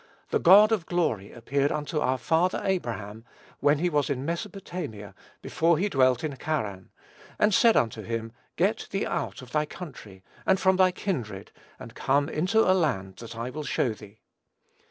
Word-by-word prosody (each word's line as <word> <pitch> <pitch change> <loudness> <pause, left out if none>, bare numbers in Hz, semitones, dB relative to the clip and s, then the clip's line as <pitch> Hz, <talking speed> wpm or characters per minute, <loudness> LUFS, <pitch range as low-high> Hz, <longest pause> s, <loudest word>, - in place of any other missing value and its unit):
"The - - +2
God 205 +5 +7
of 200 -7 0
glory 150 - -1
appeared 140 +4 -1
unto 150 +1 -2
our 130 -3 +1
father 165 +7 +1
Abraham, 115 - -3 0.4
when 145 +1 +3
he 175 +4 0
was 150 -4 0
in 135 -1 -2
Mesopotamia, 170 - -5 0.3
before 165 0 +2
he 200 +5 0
dwelt 130 -5 +3
in 150 -3 -3
Charran, 105 -12 -3 0.5
and 210 0 +3
said 230 +3 +5
unto 110 -1 0
him, 115 +1 -4 0.2
Get - - 0
thee - - -1
out - - -3
of 125 - -13
thy 150 0 0
country, 115 - -10 0.2
and 190 - +2
from 190 -1 +3
thy 185 -1 +5
kindred, 120 - -4 0.3
and 115 - -11
come 140 +4 +1
into 185 +9 +2
a 185 - +5
land 115 - -1
that 115 -1 -9
I 115 +2 -4
will 155 +4 -5
show 125 -4 0
thee. 105 0 -15
145 Hz, 175 wpm, -27 LUFS, 115-175 Hz, 0.5 s, God